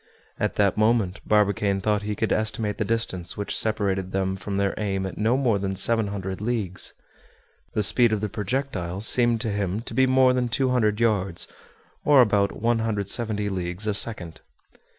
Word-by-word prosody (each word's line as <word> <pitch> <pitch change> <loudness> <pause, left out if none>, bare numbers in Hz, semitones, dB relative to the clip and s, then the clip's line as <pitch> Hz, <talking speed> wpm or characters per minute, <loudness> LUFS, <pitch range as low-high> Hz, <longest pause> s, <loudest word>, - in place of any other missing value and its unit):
At - - -1
that 100 -1 +2
moment 110 -3 +1
Barbicane 100 -1 +2
thought 105 +1 0
he 105 0 -3
could 110 +2 -1
estimate 110 -1 -1
the - - +2
distance 100 -5 -3
which 105 - -2
separated 100 -4 -1
them 95 0 -1
from 95 +1 -5
their 100 0 +1
aim 95 -2 -1
at 95 - -5
no 115 +4 +2
more 120 -7 +1
than 95 0 -2
700 100 -2 0
leagues. 105 -6 -3 0.8
The 105 - +1
speed 120 +3 +4
of 110 - 0
the 105 - -2
projectile 100 -4 -3
seemed 120 0 +2
to 115 -3 -1
him 100 0 -2
to 120 - -8
be 130 0 +3
more 130 0 +4
than 125 -1 0
200 120 -4 +1
yards, 100 -6 +1 0.6
or 145 -2 +5
about 100 -4 +2
170 110 -1 -1
leagues 90 +1 -4
a 105 - 0
second. 95 -6 0
105 Hz, 170 wpm, -24 LUFS, 95-115 Hz, 0.8 s, or